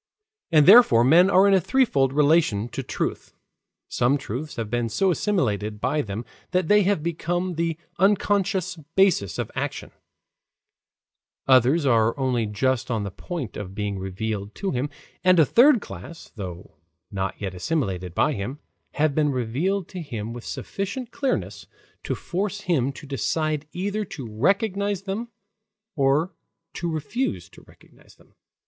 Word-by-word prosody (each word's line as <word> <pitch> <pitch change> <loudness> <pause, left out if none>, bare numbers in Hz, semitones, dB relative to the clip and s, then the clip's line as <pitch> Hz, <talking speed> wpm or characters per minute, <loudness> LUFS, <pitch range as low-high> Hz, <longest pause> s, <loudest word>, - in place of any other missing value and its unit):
And 155 -3 +6
therefore 195 - +8
men 170 +9 +6
are 195 0 +5
in 200 - +4
a 190 - +4
threefold 165 - +2
relation 145 -7 +2
to - - -4
truth. - - -4 0.5
Some 125 +4 +1
truths 135 +3 -6
have 115 -2 -3
been 120 -1 0
so 190 - +2
assimilated 110 - -1
by 135 +6 0
them 110 0 -5 0.3
that 180 -2 +1
they 210 0 +6
have 195 -5 +1
become 175 +2 -2
the 165 -1 -1 0.2
unconscious 195 -1 +1 0.2
basis 190 - +3
of - - -3
action, - - -4 1.6
others 130 +4 +4
are 115 -2 +3
only 125 -5 0
just 130 +4 -1
on 110 -4 -1
the 100 - -5
point 155 - -6
of 95 -2 -7
being 105 -2 -3
revealed 100 +2 -4
to 195 - -2
him, 135 +3 -2 0.3
and 185 -1 +5
a 160 - +7
third 245 - +5
class, 170 -4 -10
though 90 -6 -8 0.3
not 95 -1 -3
yet 95 -3 -4
assimilated 90 - -2
by 150 - +2
him, 115 +6 -4 0.4
have 150 -1 +1
been 150 0 +2
revealed 145 - -1
to 185 - -6
him 115 -7 -5
with 120 -1 -8
sufficient 215 +5 -5
clearness 270 -3 -2 0.3
to - - -3
force 205 +3 -3
him 140 -9 +1
to 145 - -11
decide 150 +2 -1
either 205 +4 -2
to 150 -9 -8
recognize 200 - 0
them 200 +4 -4 0.7
or 145 +5 +2 0.4
to 170 -1 -3
refuse 160 - -3
to - - -16
recognize - - -21
them. - - -25
150 Hz, 150 wpm, -24 LUFS, 115-185 Hz, 1.6 s, therefore